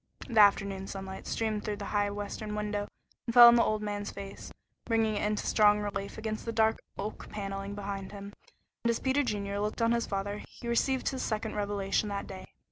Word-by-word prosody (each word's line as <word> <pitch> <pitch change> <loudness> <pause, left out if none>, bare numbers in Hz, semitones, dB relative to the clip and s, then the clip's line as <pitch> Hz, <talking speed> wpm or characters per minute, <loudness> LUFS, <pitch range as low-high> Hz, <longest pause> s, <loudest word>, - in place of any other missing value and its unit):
The 230 -3 +2
afternoon 195 -1 +4
sunlight 190 -1 -7
streamed 220 -2 -1
through 210 - -2
the 205 - -6
high 205 -1 +2
western 205 +1 -5
window 210 -1 -2 0.4
and 235 - -1
fell 240 -1 +12
on - - +6
the 235 - +5
older 215 0 0
man's 205 0 -3
face, 195 0 -8 0.3
bringing 225 -2 +2
it 205 - -1
into 210 0 0
strong 210 -1 +5
relief 200 -1 -4
against 220 0 -4
the 230 - -3
dark 220 0 +2 0.2
oak 205 +2 -5
paneling 195 -1 -5
behind 195 -1 -5
him, 200 0 -8 0.5
and 235 - +2
as 230 - +1
Peter 265 +2 +2
Junior 200 -5 -2
looked 210 +3 -2
on 230 0 +3
his 235 0 +1
father 200 +1 -3
he 235 - -10
received 255 +2 +1
his 260 -1 -4
second 220 0 -2
revelation 205 0 -1
that 200 0 -3
day. 190 -1 -9
210 Hz, 205 wpm, -30 LUFS, 200-220 Hz, 0.5 s, fell